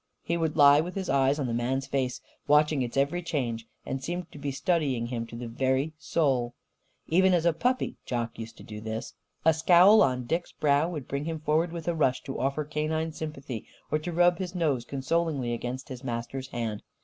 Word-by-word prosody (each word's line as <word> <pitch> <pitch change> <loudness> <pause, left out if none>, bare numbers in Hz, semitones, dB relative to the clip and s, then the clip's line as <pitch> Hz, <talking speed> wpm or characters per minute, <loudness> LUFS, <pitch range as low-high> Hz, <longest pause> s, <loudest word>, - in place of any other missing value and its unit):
He 170 - -1
would 160 -2 -1
lie 145 0 +8
with 180 +4 -6
his 190 -2 -2
eyes 135 +1 +3
on 145 - -1
the 120 - -2
man's 130 +3 0
face, 130 -2 -2 0.3
watching 150 -1 +4
its 120 +1 -3
every 140 +6 +1
change; 120 -9 -2 0.2
and 135 0 -4
seemed 175 +3 -4
to 145 - -11
be 145 0 -3
studying 140 -4 0
him 120 -1 -4
to 115 - -10
the 120 0 -5
very 130 +5 0
soul. 130 -8 0 0.5
Even 185 +2 +5
as 170 -1 +1
a 170 - +4
puppy, 250 +10 0
Jock 115 -2 -3
used 115 +1 -8
to - - -12
do 105 0 -8
this. 110 +1 -5 0.3
A 160 - +6
scowl 180 +6 +6
on 125 -1 +2
Dick's 165 +7 -2
brow 145 +2 +2
would 150 -7 -5
bring 140 +1 -3
him 165 -1 -3
forward 160 +2 +1
with 170 -1 -6
a 170 - +2
rush, 130 -5 +1
to 135 - -5
offer 140 +3 0
canine 155 +2 -1
sympathy 140 -7 -6 0.2
or 155 - +2
to 175 +3 -5
rub 175 +1 +4
his 185 -1 -4
nose 145 -9 0
consolingly 140 -1 -1
against 125 +3 -5
his 130 -1 -7
master's 125 +2 -4
hand. 115 -4 -3
140 Hz, 210 wpm, -28 LUFS, 125-165 Hz, 0.5 s, lie